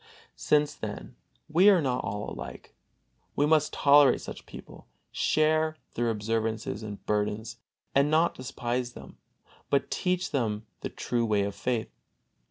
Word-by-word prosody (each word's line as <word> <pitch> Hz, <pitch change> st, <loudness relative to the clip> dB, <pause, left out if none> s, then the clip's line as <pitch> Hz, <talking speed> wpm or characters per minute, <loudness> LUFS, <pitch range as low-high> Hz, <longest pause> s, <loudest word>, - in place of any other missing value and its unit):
Since, 150 Hz, -, +2 dB
then, -, -, -7 dB, 0.3 s
we 180 Hz, +6 st, +6 dB
are 195 Hz, -3 st, +6 dB
not 130 Hz, -5 st, -1 dB
all 105 Hz, +1 st, -4 dB
alike, 65 Hz, 0 st, -8 dB, 0.6 s
we 145 Hz, -, +3 dB
must 155 Hz, 0 st, +3 dB
tolerate 145 Hz, -1 st, +5 dB
such -, -, -9 dB
people, -, -, -12 dB, 0.2 s
share 155 Hz, 0 st, +2 dB, 0.2 s
their 120 Hz, 0 st, 0 dB
observances 110 Hz, -1 st, -2 dB
and 105 Hz, -2 st, -8 dB
burdens, 105 Hz, +1 st, -2 dB, 0.3 s
and 140 Hz, +2 st, +4 dB
not 160 Hz, +2 st, +3 dB
despise 125 Hz, -1 st, -3 dB
them, -, -, -12 dB, 0.5 s
but 140 Hz, -1 st, +1 dB
teach 180 Hz, -1 st, -1 dB
them 110 Hz, -6 st, -1 dB
the -, -, -4 dB
true 120 Hz, -1 st, -2 dB
way 105 Hz, -3 st, +2 dB
of 100 Hz, 0 st, -3 dB
faith. 120 Hz, 0 st, -2 dB
120 Hz, 140 wpm, -28 LUFS, 105-150 Hz, 0.6 s, we